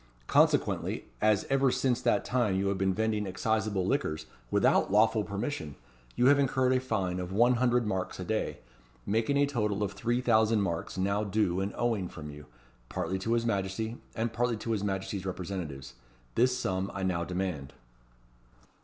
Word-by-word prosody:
Consequently, - - +2 0.2
as 105 -2 +3
ever 135 0 +3
since 125 -1 +1
that - - +2
time 120 -6 +1
you 100 +1 +1
have 100 - -1
been 95 0 +2
vending 110 +1 0
exciseable 105 0 0
liquors 80 - -1 0.2
without - - +3
lawful 110 +1 +4
permission, 100 - -4 0.4
you 125 - +2
have 140 +2 +6
incurred 130 -1 +2
a 130 - +3
fine 95 -8 -1
of 90 0 -5
one 120 +5 +4
hundred 120 -1 +2
marks 95 -3 -3
a - - -3
day, - - -2 0.5
making 115 +7 +1
a 145 - +4
total 105 -7 -1
of 100 - -1
three 120 +3 -1
thousand 110 -3 +3
marks 85 0 -3
now 100 +2 +1
due 100 -3 0
and 100 +1 -1
owing 115 -6 0
from 75 -2 -8
you, 75 0 -12 0.4
partly 95 +3 -2
to 115 +5 -1
his 115 0 +1
Majesty, 110 +2 -2 0.2
and 115 0 -1
partly 120 0 0
to 115 - -4
his 105 -3 0
Majesty's 95 -1 -2
representatives. 90 -7 -5 0.4
This 125 +1 +3
sum 95 +1 -1
I 95 - -3
now 90 -2 0
demand." 90 -6 -3
105 Hz, 170 wpm, -30 LUFS, 95-120 Hz, 0.5 s, have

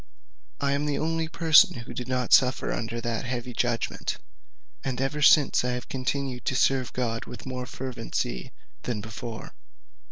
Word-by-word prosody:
"I 140 -1 +1
am 145 +1 0
the 145 - 0
only 165 0 -1
person 160 -1 +5
who 120 - -9
did 125 - -5
not 125 -2 0
suffer 130 0 +4
under 115 +1 -3
that 115 -2 -2
heavy 125 0 -4
judgment, 120 -1 -1 0.7
and 130 -2 -2
ever 135 +3 -1
since 145 -2 +6
I 125 0 0
have 125 - -5
continued 130 -1 -2
to 130 - 0
serve 130 -1 +2
God 115 -2 -2
with - - -10
more 125 -1 -4
fervency 125 0 -4 0.3
than 115 -4 -3
before. 110 +2 -7
125 Hz, 160 wpm, -27 LUFS, 120-135 Hz, 0.7 s, since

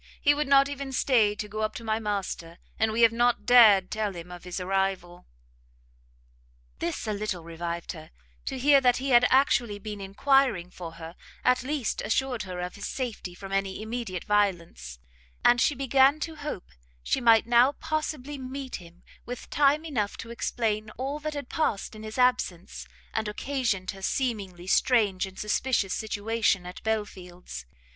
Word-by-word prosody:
He 290 - +4
would 295 0 -1
not 275 0 +6
even 280 -1 -5
stay 225 -6 +3
to 210 - -5
go 215 +1 -5
up 215 - -1
to 235 - -7
my 220 0 0
master, 195 -5 -4 0.2
and 220 0 +2
we 225 +2 0
have 230 - +7
not 240 +1 +1
dared 215 -6 +7
tell 215 -3 -2
him 175 +1 -9
of 175 0 -10
his 180 +1 -4
arrival." 185 -1 -2 1.5
This 170 - -3
a 215 - -1
little 200 -4 -3
revived 170 +1 -5
her; 160 -1 -10 0.4
to 265 - -3
hear 280 +1 +5
that 250 -2 +4
he 270 +1 -3
had 245 0 +6
actually 245 -5 +3
been 210 0 -7
enquiring 200 -2 +2
for 170 -3 -8
her, 165 +1 -9 0.3
at 250 0 +3
least 270 -2 -2
assured 245 +2 -1
her 180 -1 -5
of 180 0 -4
his 200 - -6
safety 230 -8 -5
from 195 +1 -9
any 195 0 -1
immediate 220 -5 -4
violence, 175 - -1 0.5
and 240 0 +6
she 295 - +3
began 270 +2 +4
to 320 0 -4
hope 295 -10 -6 0.3
she - - 0
might 230 -2 +5
now 240 +4 +5
possibly 305 -3 -4
meet 260 -3 -6 0.5
with 245 0 -6
him - - -16
time 295 +2 +3
enough 220 -10 -2
to 230 - -8
explain 220 -2 -2
all 275 +3 -3
that 305 0 -4
had 285 -3 -5
past 245 -12 -1
in 215 - -10
his 220 +2 -7
absence, 245 -8 0 0.3
and 220 -1 -1
occasioned 215 -4 -2
her 195 -1 -12
seemingly 195 -7 -2
strange 200 -2 +2
and 190 0 -13
suspicious 210 -2 0
situation 220 -3 0
at 180 +1 -9
Belfield's. 180 - -5
220 Hz, 170 wpm, -27 LUFS, 190-260 Hz, 1.5 s, have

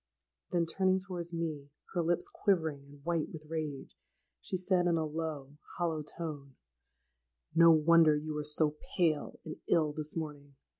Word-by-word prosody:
Then 170 -2 +1
turning 185 +2 +2
towards 180 -3 -5
me, 155 -4 -3 0.2
her 175 - +1
lips 175 - +1
quivering 170 - 0
and 140 0 -16
white 170 -2 0
with 155 -1 -9
rage, 155 -3 -5 0.5
she 185 - -2
said, 180 -1 +2
in 170 -1 +3
a 160 - 0
low 150 -2 -5 0.2
hollow 165 -3 0
tone, 150 -3 -7 1.0
'No 165 +1 +8
wonder 160 0 +6
you 155 +1 -4
are - - -2
so 150 0 0 0.2
pale 160 -5 +1
and 155 - -6
ill 155 -3 +3
this 150 0 -3
morning! 145 -3 -6
160 Hz, 155 wpm, -32 LUFS, 150-170 Hz, 1.0 s, No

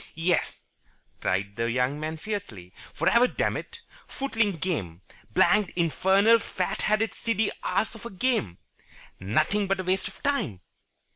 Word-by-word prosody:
"Yes!" 170 +1 0 0.5
cried 100 +2 -1
the 115 0 0
young 125 +4 0
man 155 +1 -4
fiercely. 150 - -6 0.2
"For - - -2
ever, 240 +2 +5
dammit! 465 - -3 0.3
Footling 230 -7 0
game! 110 - -3 0.3
Blanked 205 - +3
infernal 190 +6 +4
fat 185 -3 -3
headed 215 +1 +1
silly 220 -2 0
ass 220 - 0
of 225 0 -8
a - - -8
game! 190 - -1 0.6
Nothing 155 - +1
but 195 0 0
a - - -1
waste 185 +1 0
of - - -13
time." 280 - -1
185 Hz, 140 wpm, -27 LUFS, -, 0.6 s, ever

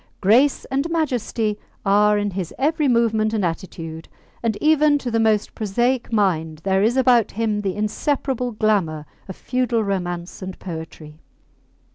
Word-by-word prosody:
Grace 240 +8 +3
and 275 +5 0
majesty 245 -9 -1 0.3
are 210 +1 +4
in 205 0 -1
his 180 -3 -4
every 300 +2 +1
movement 225 -3 +2
and 205 -4 0
attitude, 165 -1 -6 0.3
and 225 -3 -1
even 305 -1 +4
to 255 -4 -4
the 225 - +1
most 215 -2 +1
prosaic 240 +5 -1
mind 165 -7 0
there 190 0 +2
is 230 +5 +2
about 250 -4 +4
him 215 -1 -1
the 195 -2 -2
inseparable 250 +4 -1
glamour 195 -9 0 0.2
of 190 - -7
feudal 250 -3 -1
romance 175 -3 -3
and 185 0 -6
poetry. 160 -3 -8
215 Hz, 145 wpm, -21 LUFS, 190-245 Hz, 0.3 s, are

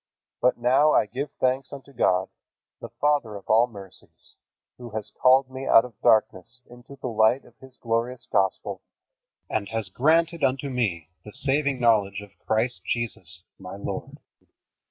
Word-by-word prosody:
But 125 - +3
now 130 +6 +3
I - - +4
give 130 +7 -5
thanks 130 0 -1
unto 140 0 -11
God, 95 -6 +1 0.5
the - - -8
Father 145 -8 0
of 100 - -10
all 115 +3 +4
mercies, 100 -5 -11 0.5
who 120 -1 -8
has 110 -2 -4
called 130 +1 +3
me 130 +1 -6
out 115 - +6
of 125 - -11
darkness 110 +3 +1
into 120 +3 -14
the 135 - -11
light 110 +3 +2
of - - -20
His 130 -1 -14
glorious 115 +1 -2
Gospel, 95 -1 -1 0.7
and 100 -2 -2
has 110 -4 -3
granted 165 - +2
unto 135 +2 0
me 95 -11 -2
the 105 - -11
saving 140 0 0
knowledge 105 -5 +2
of 105 -1 -13 0.2
Christ 115 +3 0
Jesus, 90 -7 -4 0.2
my 95 0 -8
Lord. 100 - -6
120 Hz, 155 wpm, -25 LUFS, 105-130 Hz, 0.7 s, out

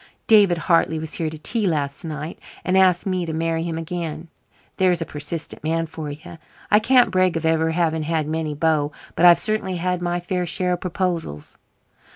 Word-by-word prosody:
"David 205 -6 +5
Hartley 165 -1 +2
was 155 0 -5
here 160 -2 -2
to 155 - -8
tea 210 +7 -1
last 145 -4 -2
night, 155 0 -6 0.3
and 185 - +1
asked 185 -2 +4
me 185 -2 -1
to 160 - -3
marry 165 0 -1
him 165 -1 -3
again. 165 -1 -5 0.5
There's 180 -2 +3
a 165 - -2
persistent 150 +2 -6
man 165 +1 0
for 155 -1 -7
you. 160 +3 -10 0.3
I 210 - +7
can't 250 +2 +4
brag 185 -2 +2
of 160 - -3
ever 160 0 +2
having 160 -1 0
had 155 -1 -1
many 155 -1 -2
beaux, 150 -1 +1 0.2
but 175 - +6
I've 175 - +8
certainly 215 -4 -1
had 180 +1 -1
my 175 0 -1
fair 180 0 -2
share 180 +2 0
of 175 - -4
proposals." 175 - -3
165 Hz, 190 wpm, -22 LUFS, 160-180 Hz, 0.5 s, I've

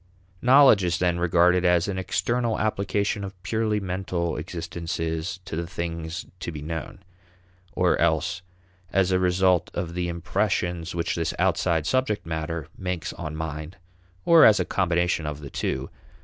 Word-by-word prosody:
Knowledge 130 -5 +6
is 85 -1 +1
then 90 -1 +1
regarded 90 +1 +3
as 90 0 +3
an 95 -2 -2
external 115 +4 0
application 100 -1 -1
of 95 -1 -7
purely 110 +3 0
mental 90 -3 -2
existences 85 +1 -4
to 80 - -5
the 85 +1 -3
things 85 0 -5
to 85 - -4
be 75 -2 -7
known, 80 +4 -6 0.7
or 90 -1 +2
else 85 +2 +1 0.5
as 95 -1 +2
a 90 - +3
result 90 -1 +2
of 85 -1 -3
the 90 0 -2
impressions 85 -1 -1
which 85 0 -1
this 80 -2 -2
outside 80 -4 +1
subject 110 +3 0
matter 80 -1 -4
makes 90 -3 -4
on 75 0 -6
mind, 80 +2 -5 0.5
or 165 -1 +7
as 105 - +7
a - - +1
combination 90 -3 0
of 75 -1 -4
the 70 -2 -9
two. - - -3
85 Hz, 150 wpm, -25 LUFS, 80-95 Hz, 0.7 s, or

